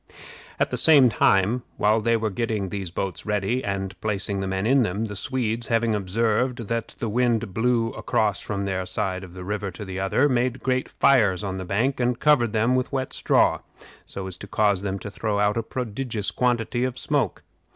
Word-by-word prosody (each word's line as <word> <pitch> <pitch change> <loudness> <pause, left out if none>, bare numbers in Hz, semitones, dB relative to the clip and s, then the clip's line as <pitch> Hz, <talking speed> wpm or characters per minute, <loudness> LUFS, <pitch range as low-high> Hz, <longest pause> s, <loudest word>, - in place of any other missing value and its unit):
At - - +1
the - - -1
same 145 -6 +6
time, 105 +3 +3 0.2
while 110 +2 +3
they 115 +1 +2
were 110 -1 -2
getting 110 -2 -2
these 95 -2 -4
boats 95 +2 -4
ready, 105 +4 -1
and 95 -1 -3
placing 100 -2 -2
the 95 - -2
men 95 +1 -2
in 135 +3 +4
them, 105 0 -1
the 105 -2 -6
Swedes, 115 +1 -2
having 115 -1 +1
observed 115 +4 0
that 115 -1 -3
the 115 - -3
wind 115 -2 0
blew 115 +1 +1
across 105 -4 0
from 100 -1 -3
their 95 -1 -2
side 95 -1 -2
of 90 -2 -11
the 90 0 -8
river 100 +1 -3
to 100 +3 -8
the 95 -1 -5
other, 95 +9 +2
made 125 -1 0
great 130 -1 0
fires 105 -8 +3
on 95 -1 -3
the 95 - -5
bank, 115 +9 0
and 125 -1 0
covered 130 -7 +3
them 115 +3 +2
with 130 0 -1
wet 135 -2 -2
straw, - - +2 0.4
so 95 - -7
as 95 -1 -8
to 100 - -8
cause 100 -2 +2
them 100 -1 -2
to 100 +1 -7
throw 105 0 -2
out 105 0 +2
a 115 - 0
prodigious 115 -2 -2
quantity 120 -1 0
of 130 -1 -2
smoke. 135 - -1
110 Hz, 205 wpm, -24 LUFS, 100-120 Hz, 0.4 s, same